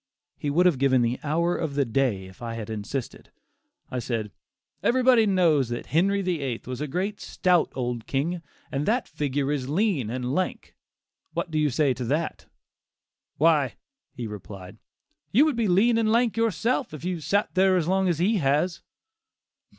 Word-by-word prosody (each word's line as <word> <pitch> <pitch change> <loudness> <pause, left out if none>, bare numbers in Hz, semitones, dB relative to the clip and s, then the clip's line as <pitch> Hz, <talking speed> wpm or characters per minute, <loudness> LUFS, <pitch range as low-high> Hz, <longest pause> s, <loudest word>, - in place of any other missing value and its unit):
He 145 - -3
would 170 +6 +3
have 170 -8 +3
given 130 -2 +3
the 120 +2 -1
hour 170 +4 +1
of 155 -4 -3
the 140 -1 +2
day 115 -5 0
if 95 +3 -15
I 115 -1 -4
had 110 -1 -6
insisted; 110 +5 -5 0.6
I 125 - -2
said 115 -3 -3 0.5
"everybody 245 -3 +4
knows 165 - +3
that 120 0 -4
'Henry 195 +5 +1
VIII,' 140 -10 -2
was 130 +2 -5
a 150 - -2
great 195 +7 -2
stout 180 -3 +1
old 120 -3 -3
king, 165 +6 -1 0.3
and 145 +1 -2
that 235 +4 +1
figure 140 -1 -1
is 135 -3 -2
lean 165 - +1
and 125 +1 -3
lank; 185 +4 -2 0.6
what 170 - -3
do 155 - 0
you 150 -1 +2
say 135 +1 +2
to 125 -1 -5
that?" 155 +6 -2 0.9
"Why," 150 -5 +3 0.4
he 120 - -5
replied, 100 -1 -9 0.5
"you 270 +9 +5
would 305 -4 +1
be 230 -2 +1
lean 225 +6 +4
and 220 -1 +2
lank 235 -1 +2
yourself, 230 - 0
if 155 - -9
you 180 -2 -2
sat 200 +6 0
there 185 0 +4
as 165 -3 0
long 190 0 +2
as 170 - +1
he 200 +6 +2
has." 155 +3 +1
150 Hz, 175 wpm, -26 LUFS, 130-185 Hz, 0.9 s, you